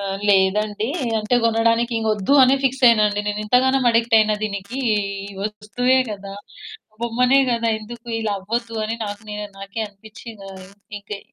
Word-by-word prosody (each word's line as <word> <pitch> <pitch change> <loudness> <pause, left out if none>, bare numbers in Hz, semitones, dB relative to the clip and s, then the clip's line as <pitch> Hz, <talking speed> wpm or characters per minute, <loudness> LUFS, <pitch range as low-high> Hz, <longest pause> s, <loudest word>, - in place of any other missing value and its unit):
ఆ! - - -5 0.3
లేదండి. 205 +2 +2 0.3
అంటే 215 +3 -1
కొనడాని 230 0 +2
ఇంకొద్దు 215 0 0
అని 260 +1 +5
ఫిక్స్ 265 0 0
అయ్యానండి 210 -3 +4
నేను 210 0 -2
ఇంతగానం 255 +3 +2
అడిక్టయిన 225 -2 +3
దీనికి 200 +4 -4 0.5
ఈ 200 - -12
వస్తువే 215 +5 0
కదా 200 -1 -7 0.7
బొమ్మనే 250 +3 +3
గదా 230 -1 0
ఎందుకిలా 225 -1 -5
అవ్వద్దు 230 +4 -4
అని 225 - -2
నాకు 205 +1 -6
నె 210 - -5 0.2
నాకే 195 +3 -6
అనిపిచ్చింది 215 +1 -13
ఆ - - -11 0.4
ఇంకె 205 0 -8
220 Hz, 140 wpm, -21 LUFS, 205-235 Hz, 0.7 s, అని